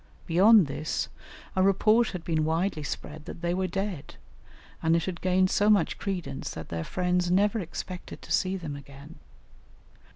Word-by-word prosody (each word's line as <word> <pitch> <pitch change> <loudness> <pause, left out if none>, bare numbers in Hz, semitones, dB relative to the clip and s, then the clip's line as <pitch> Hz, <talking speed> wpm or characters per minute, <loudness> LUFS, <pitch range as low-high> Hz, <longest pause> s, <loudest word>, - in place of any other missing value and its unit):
Beyond 195 +3 +6
this, 145 +2 -3 0.5
a 190 - +3
report 215 +4 +4
had 180 -3 -6
been 160 -2 0
widely 160 +1 0
spread 150 +1 -6
that - - -8
they 170 0 +1
were 185 +1 0
dead, 195 -3 -4 0.7
and 165 0 +3
it 165 - +1
had 185 -2 -5
gained 185 0 +2
so 205 +1 +3
much 200 -6 +3
credence 180 -8 -4
that 80 - -7
their 85 -1 -3
friends 180 - 0
never 205 +4 +3
expected 180 0 -6
to - - -10
see 190 +1 +1
them 155 -5 -6
again. 140 +2 -12
180 Hz, 165 wpm, -28 LUFS, 160-195 Hz, 0.7 s, Beyond